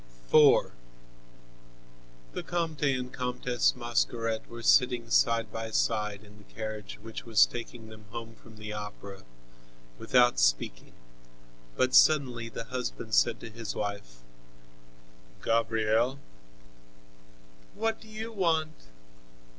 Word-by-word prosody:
IV 150 -2 +6 1.6
The - - -3
Comte 165 -4 -3
and 130 -2 -1
Comtesse 125 -1 0
Mascaret 115 -2 -1
were 115 0 -9
sitting 120 -2 +3
side 115 -2 +3
by 115 0 -5
side 105 -2 -1
in 105 0 -17
the - - -17
carriage 110 -2 -6
which 110 0 -7
was 115 -3 +5
taking 120 -1 -8
them 110 -1 -13
home 115 +1 -7
from 110 0 -17
the 110 0 -7
Opera, 105 -2 -8 0.8
without 120 -1 +3
speaking - - 0 0.8
but 130 0 +1
suddenly 125 -6 +4
the 115 - -6
husband 120 -2 -5
said 115 +1 +3
to - - -8
his 110 -1 -6
wife: 100 -13 -5 1.2
"Gabrielle!" 115 +2 +1 1.6
"What 225 0 -1
do 220 - -14
you 220 +1 -6
want?" 160 - -1
115 Hz, 115 wpm, -29 LUFS, 110-125 Hz, 1.6 s, IV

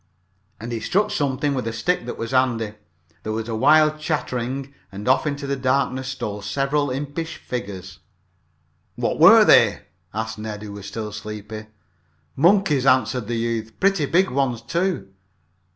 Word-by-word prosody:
And 115 +3 -6
he 115 - -2
struck 200 - +1
something 140 0 0
with 125 -4 -2
a - - -1
stick 120 +4 -1
that - - -5
was 115 - -4
handy. 120 -5 +1 0.5
There 110 - -4
was 110 0 -3
a 115 - -3
wild 155 +5 +4
chattering 135 -3 -3 0.2
and 100 +3 -7
off 130 +4 +3
into 140 -1 -3
the 140 0 -1
darkness 130 0 0
stole 105 -6 -4
several 140 +6 0
impish 145 +5 -4
figures. 95 -6 -6 1.0
"What - - -2
were - - +8
they?" - - +5 0.3
asked 110 0 -4
Ned, 105 -1 -6
who 105 - -7
was 100 -1 -8
still 105 +1 -5
sleepy. 105 +1 -7 0.7
"Monkeys," 165 -4 +3
answered 125 -3 +2
the 120 0 -2
youth, 115 -1 -3
"Pretty 195 -7 +2
big 185 +5 +2
ones, 125 -3 -1
too." 170 - -2
125 Hz, 155 wpm, -22 LUFS, 110-145 Hz, 1.0 s, were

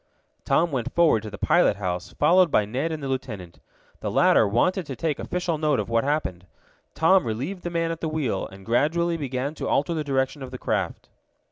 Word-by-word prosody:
Tom 170 0 +2
went 125 -4 -2
forward 165 -10 +4
to 110 - -7
the 105 - -8
pilot 175 - +3
house, 90 -2 -4
followed 175 +4 +4
by 105 - +3
Ned 130 +10 -2
and 155 -2 -5
the - - -2
lieutenant. 110 -10 -5 0.4
The - - -3
latter 110 - +4
wanted 165 - +1
to 135 - -5
take 155 +1 -2
official 175 -3 -2
note 150 -3 +1
of - - -3
what 115 0 +2
happened. 135 - -2 0.5
Tom 185 +3 +4
relieved 135 - -4
the 175 - -4
man 165 -1 -1
at 165 - -6
the 160 - -1
wheel, 145 -11 -2
and 95 0 -14
gradually 165 +8 +1
began 135 -1 -3
to - - -5
alter 150 +5 +1
the 155 -2 -2
direction 135 0 -1
of 130 - -6
the - - -7
craft. - - -3
145 Hz, 210 wpm, -25 LUFS, 115-165 Hz, 0.5 s, forward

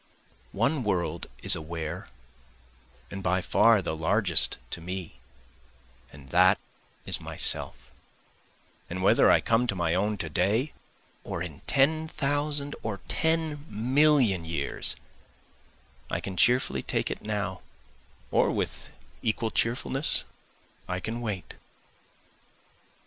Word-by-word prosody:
One 140 -1 +1
world 85 -5 -2 0.2
is - - +11
aware 80 +3 -6 1.0
and 100 - -6
by 90 0 +1
far 110 +3 +3
the 80 - -3
largest 90 +1 +2
to - - -5
me, 90 -6 -7 0.9
and 70 -1 -14
that 90 +5 +5 0.5
is - - +1
myself, - - +2 1.1
And 95 +2 -4
whether - - +5
I - - +5
come 115 +2 +1
to 100 - -1
my 85 -2 0
own 105 +3 0
to 85 - -4
day 100 - 0 0.5
or 85 - -4
in 80 -5 -9
ten 155 +3 +2
thousand 145 -1 -2
or 100 -4 -5
ten 160 -2 -1
million 125 - +2
years, 70 -6 -1 1.1
I - - -2
can 95 - -6
cheerfully 125 +7 +2
take - - -2
it - - -5
now, 105 -3 -3 0.7
or - - +3
with - - -3 0.3
equal 110 0 -1
cheerfulness 130 +4 +1 0.6
I 90 0 -3
can 115 +5 -5
wait. 100 -7 -5
100 Hz, 115 wpm, -27 LUFS, 90-130 Hz, 1.1 s, is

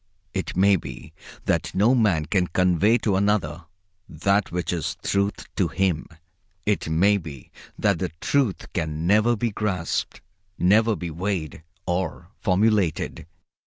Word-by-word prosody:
It 95 -2 -3
may 100 +1 +5
be 80 - -9 0.3
that - - 0
no 110 +6 +4
man 100 -11 +2
can 90 0 +1
convey 90 +6 +3
to 105 -4 0
another 90 -6 0 0.4
that 100 +6 +1
which 90 +1 -2
is 85 - -3
the - - -5
Truth 100 +1 0
to 95 - +2
him. 85 0 0 0.6
It 105 -5 0
may 95 +6 +4
be 75 -8 -9 0.3
that - - +1
the - - -1
Truth 135 -9 0
can 80 -2 -2
never 110 +5 +4
be 115 +1 -1
grasped, 100 -5 -2 0.4
never 110 +4 +4
be 90 -3 -5
weighed 85 -3 -3 0.2
or 90 0 -3
formulated. 100 -5 +1
95 Hz, 140 wpm, -24 LUFS, 85-105 Hz, 0.6 s, may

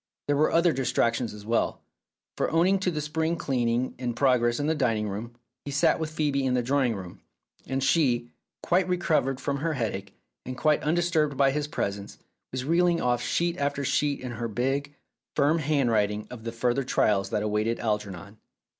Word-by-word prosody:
There 145 - +1
were 150 +2 +3
other 170 0 +4
distractions 120 -2 0
as 105 -1 -11
well, 115 +1 0 0.5
for - - -1
owing 180 +4 +3
to 190 - 0
the 155 -3 -2
spring 160 +2 -1
cleaning 125 -5 0
in 120 -2 -2
progress 120 -2 +2
in 145 - -1
the 160 - +2
dining 115 -8 0
room, 110 +4 -6 0.3
he - - -6
sat 140 +1 +2
with 160 -1 -2
Phcebe 150 -3 0
in 130 -1 +1
the 125 - +1
drawing 130 -2 +1
room, 90 -3 -9 0.5
and 135 +1 -1
she, 130 -5 +2 0.3
quite 180 +1 +2
recovered 155 -7 +1
from 140 +1 -2
her 160 +3 -1
headache, 100 -7 -4 0.3
and 130 +1 -6
quite 155 0 +2
undisturbed 155 -3 +1
by 135 0 +4
his 150 +1 -2
presence, 100 -9 -4 0.3
was 130 0 -3
reeling 170 +2 +3
off 120 -3 +1
sheet 170 +5 0
after 140 0 -1
sheet 145 +1 +1
in 130 -1 -5
her 115 0 -3
big, 135 +6 -2 0.4
firm 150 +3 +3
hand 140 -5 +1
writing 105 -1 +1
of 115 -2 -9
the 115 - -2
further 120 +3 0
trials 105 -6 +1
that 105 - -1
awaited 105 +2 0
Algernon. 105 -2 -3
130 Hz, 185 wpm, -27 LUFS, 115-150 Hz, 0.5 s, other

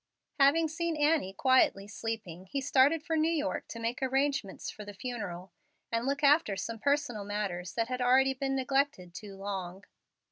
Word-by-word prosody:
Having 310 +4 +5
seen 335 0 -2
Annie 295 -9 +2
quietly 205 -4 +3
sleeping, 205 -4 -6
he 275 - -2
started 285 +3 +3
for 325 - -1
New 315 +1 +2
York 300 -3 -2
to - - -8
make 230 +3 -3
arrangements 270 -5 -1
for 215 - -10
the 205 -1 -9
funeral, 195 -6 -6 0.4
and 230 +2 -1
look 280 +2 -1
after 290 -7 +4
some 225 +4 -5
personal 280 -5 0
matters 200 -4 -3
that 230 -1 0
had 255 0 -3
already 265 +2 +4
been 270 +1 -2
neglected 265 -9 0
too 200 +1 -9
long. 195 -1 -5
250 Hz, 170 wpm, -30 LUFS, 200-280 Hz, 0.4 s, Having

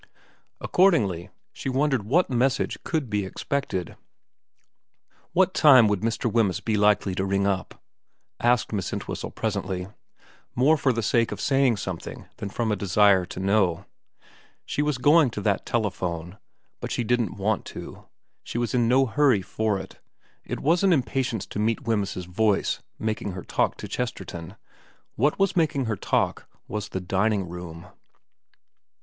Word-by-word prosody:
Accordingly 105 - +2 0.2
she - - -5
wondered 135 -1 +1
what 145 - +2
message 130 +1 0
could 155 -6 -1
be 105 -2 -1
expected. 95 - -3 0.7
* - - -40
What 185 +1 +3
time 130 -7 +7
would 105 -2 +1
Mr. 115 +2 -2
Wemyss 110 -5 +1
be 110 - -1
likely 105 -2 +3
to 95 - -1
ring 100 0 0
up? 95 -2 -2 0.3
' - - -48 0.3
asked 120 -2 +2
Miss 100 -4 -2
Entwhistle - - -4
presently, 95 -4 -3 0.7
more 140 +6 +4
for 140 -3 +2
the 115 -2 -2
sake 115 +3 +2
of - - -5
saying 135 -4 +2
something 95 - -6
than 100 - -5
from 110 +2 -1
a - - +2
desire 100 -1 +3
to - - -7
know. 95 -3 +1 0.8
She - - -2
was 150 -3 0
going 145 +3 +5
to 105 - -5
that 100 -1 0
telephone, 90 -5 -2 0.4
but - - -5
she 120 - -1
didn't 120 -4 0
want 105 +1 0
to, - - -9 0.4
she - - -5
was 120 -2 -1
in 120 -2 +2
no 130 +3 +4
hurry 130 -5 +2
for 110 0 -1
it, 95 - -9 0.4
it - - -5
wasn't 175 +5 +3
impatience 125 - -1
to - - -6
meet 110 +2 0
Wemyss's 100 -5 -1
voice 100 +3 0 0.2
making 110 -3 -3
her 90 - -7
talk - - 0
to - - -7
Chesterton; 85 -1 -5 0.6
what 145 +6 +1
was 195 0 +1
making 155 -6 +1
her 110 -1 -1
talk - - -1 0.2
was 105 -1 -4
the 95 - -4
dining 95 +1 0
room. 85 -1 -8
110 Hz, 155 wpm, -25 LUFS, 95-130 Hz, 0.8 s, time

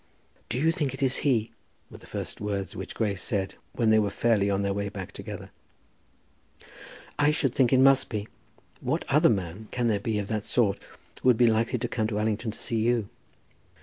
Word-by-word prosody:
"Do 120 - -1
you 160 +5 +3
think 150 -6 -2
it 140 - -4
is 130 -1 +3
he?" 120 -6 +1 0.4
were - - -11
the - - -16
first - - -6
words 100 -3 -3
which - - -6
Grace 100 -4 -1
said 100 -5 -1 0.2
when 115 -3 +2
they 110 - +6
were 105 -1 +1
fairly 105 -2 +2
on 100 0 +1
their 100 0 0
way 100 0 -2
back 95 -3 -7
together. - - -8 1.7
"I 145 0 +5
should 150 -4 +1
think 130 -3 +3
it 130 - +5
must 135 0 +5
be. 105 -2 -3 0.5
What 135 +6 -1
other 150 +4 +5
man 95 0 -2
can 120 -2 0
there 105 -2 +1
be, 110 +1 -1
of 105 - -1
that 110 -2 -1
sort, 105 -5 +1 0.4
who - - 0
would 120 - +5
be 120 - +5
likely 115 +2 +2
to 120 +1 -2
come 110 -2 -1
to 105 -2 -3
Allington 110 +1 -1
to 110 - -6
see 115 - -2
you?" 115 -2 +1
110 Hz, 210 wpm, -27 LUFS, 100-125 Hz, 1.7 s, they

